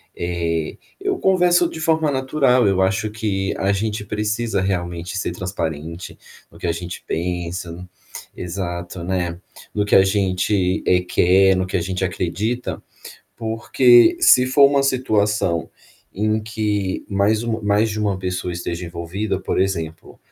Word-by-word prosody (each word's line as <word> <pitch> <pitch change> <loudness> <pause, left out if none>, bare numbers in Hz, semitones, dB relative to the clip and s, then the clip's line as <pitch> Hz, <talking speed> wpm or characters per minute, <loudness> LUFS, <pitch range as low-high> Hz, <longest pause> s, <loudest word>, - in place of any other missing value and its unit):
eh, 85 -2 -2 0.2
eu 390 -1 -1
converso 180 -2 +3
de 160 - -8
forma 160 -2 +1
natural. 130 -3 +2
Eu 95 -1 +2
acho 95 +3 +1
que 100 -3 -2
a 95 +1 +1
gente 105 +1 -2
precisa 105 +1 -1
realmente 90 0 -3
ser 95 - -2
transparente 85 -2 -5 0.3
no - - -16
que 90 - -3
a - - +2
gente 85 +1 -6
pensa. 90 +1 -4 0.5
Exato, 85 -1 -5
né, 90 -2 -2 0.3
no 105 -1 0
que - - -2
a 95 - +7
gente, 95 -1 +1
eh, 90 0 +4
quer, 95 +2 +4
no 95 0 0
que - - -4
a - - -1
gente 95 +1 -2
acredita, 95 +7 -3 0.6
porque 120 - +4
se 125 - +6
for 140 +2 +6
uma 140 -1 +3
situação 105 -9 +1 0.5
em 110 +2 0
que 105 -3 -2
mais 105 +2 +1
uma 115 -1 -2
mais 105 +2 +2
de 110 - -4
uma 100 -3 0
pessoa 90 -1 -3
esteja 85 0 -4
envolvida, 90 +4 -3
por 95 - -1
exemplo, 85 -4 -3
95 Hz, 150 wpm, -21 LUFS, 90-110 Hz, 0.6 s, a